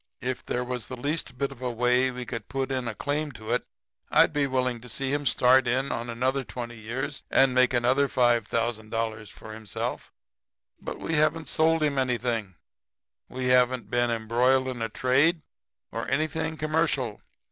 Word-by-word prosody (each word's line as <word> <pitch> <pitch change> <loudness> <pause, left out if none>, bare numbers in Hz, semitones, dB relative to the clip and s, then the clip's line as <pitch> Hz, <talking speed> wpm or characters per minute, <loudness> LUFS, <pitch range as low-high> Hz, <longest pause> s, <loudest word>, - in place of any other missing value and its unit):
If 125 0 -3
there 125 - -2
was 125 -1 -4
the 130 - -6
least 145 +1 -3
bit 140 +1 -1
of 130 -2 -12
a 125 - -1
way 125 +2 +2
we 125 -1 -6
could 115 -3 -6
put 135 0 -2
in 130 -2 -2
a 115 - -4
claim 145 +3 -2
to 110 -1 -7
it 125 - 0 0.4
I'd - - +5
be 145 -1 +1
willing 125 -3 -1
to 125 - -11
see 135 +4 -2
him 145 -1 0
start 125 +1 +4
in 130 +3 +1
for 115 +1 -3
another 130 +3 0
twenty 120 -1 -7
years 125 +6 -4
and 135 -1 +4
make 130 0 +4
another 130 +3 +3
$5,000 115 -2 0
for 110 - -11
himself, 110 -2 -5 0.7
but - - -5
we 165 - -3
haven't 155 +1 +2
sold 160 0 +3
him 140 -2 +1
anything, 120 -6 -1 0.7
we 130 0 -2
haven't 125 -1 +3
been 120 0 +2
embroiled 120 +3 +2
in 125 -2 -5
a 115 - -1
trade 140 +6 +2 0.5
or - - -4
anything 155 +1 -1
commercial. 155 -7 0
125 Hz, 175 wpm, -27 LUFS, 120-135 Hz, 0.7 s, I'd